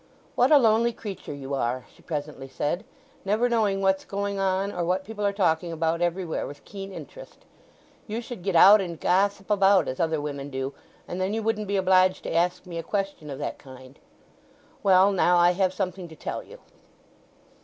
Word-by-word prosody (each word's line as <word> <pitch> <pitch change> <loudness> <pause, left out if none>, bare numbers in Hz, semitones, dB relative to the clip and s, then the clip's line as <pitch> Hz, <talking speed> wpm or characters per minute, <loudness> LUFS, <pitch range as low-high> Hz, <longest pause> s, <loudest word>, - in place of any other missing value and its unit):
"What - - +3
a 300 - +9
lonely 230 -1 +3
creature 205 -8 -7
you 140 -1 -6
are," 125 -1 -1
she - - -21
presently 150 -4 -5
said; 160 +9 -3 0.4
"never 215 +5 +1
knowing 215 -5 +1
what's 190 0 +2
going 200 0 -3
on, 195 +1 0
or 175 - -3
what 185 +2 0
people 215 -1 -6
are 200 - +2
talking 175 -4 0
about 165 +1 -1
everywhere 175 -1 -1
with 145 - -11
keen 195 -1 -8
interest. - - -11 0.6
You 220 +1 -3
should 240 -4 -8
get 190 0 -2
out, 200 +5 +8
and 170 -4 -5
gossip 195 +2 +1
about 195 -1 +4
as 130 - -4
other 160 -2 +1
women 145 -1 -5
do, 135 0 -4 0.3
and 180 - -4
then 190 +3 -1
you 225 - -2
wouldn't 215 -1 -1
be 200 0 0
obliged 185 0 +3
to - - -4
ask 175 +3 +1
me 170 -2 -6
a - - -2
question 195 -4 -3
of 135 - -5
that - - -5
kind. 130 0 -14 0.8
Well, 195 -1 +5
now, 180 -2 +3
I 175 0 +5
have 185 0 +1
something 185 -1 -4
to 160 - -13
tell - - -5
you." - - -14
185 Hz, 195 wpm, -26 LUFS, 165-200 Hz, 0.8 s, a